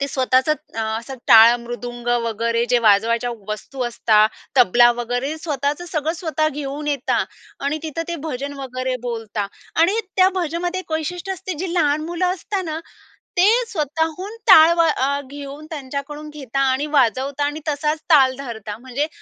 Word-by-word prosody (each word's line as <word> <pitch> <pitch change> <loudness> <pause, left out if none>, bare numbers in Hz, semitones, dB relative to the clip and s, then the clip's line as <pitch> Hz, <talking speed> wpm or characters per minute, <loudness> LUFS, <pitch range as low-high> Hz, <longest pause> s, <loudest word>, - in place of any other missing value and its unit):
ते 280 - 0
स्वतःचंच 260 +3 +2 0.2
अ, - - -1 0.2
असं 265 +4 -8
टाळ, 225 +1 +9
मृदुंग 240 0 -7 0.2
वगैरे 230 +1 0
जे 245 - +5
वाजवायच्या 230 +4 +3 0.2
वस्तू 250 +5 -5
असतात, 220 -2 +3 0.3
तबला 240 +1 +6
वगैरे 245 +5 -2
स्वतःचं 295 +1 -2
सगळं 320 -1 -1
स्वतः 320 -2 -1
घेऊन 290 0 -5
येतात 280 -3 0 0.4
आणि 295 +2 0
तिथं 320 +1 -3
ते 340 - -2
भजन 280 0 -4
वगैरे 255 -1 -3
बोलता 225 -4 -3 0.3
आणि 380 +7 +3 0.2
त्या 370 0 +6
भजनामध्ये 350 +2 -2
एक 350 - -11
वैशिष्ट्य 350 +4 -3
असते 375 0 -5
जे 365 -1 -3
लहान 305 -3 +2
मुलं 345 +2 -1
असत 370 +3 -4
ना, 315 0 -4 0.6
ते 360 +2 +6 0.2
स्वतःहून 320 +3 -2
टाळ 320 +2 +9
व - - +5 0.2
अ, 280 +2 +1
घेऊन 285 +1 -8
त्यांच्याकडून 290 +1 -6
घेतात 275 -3 -4
आणि 265 +3 +1
वाजवतात 270 +4 +1
आणि 295 +2 -3
तसाच 300 +1 -1
ताल 265 -4 +6
धरतात. 220 -6 -6
म्हणजे 260 +4 -2
280 Hz, 155 wpm, -21 LUFS, 245-315 Hz, 0.6 s, टाळ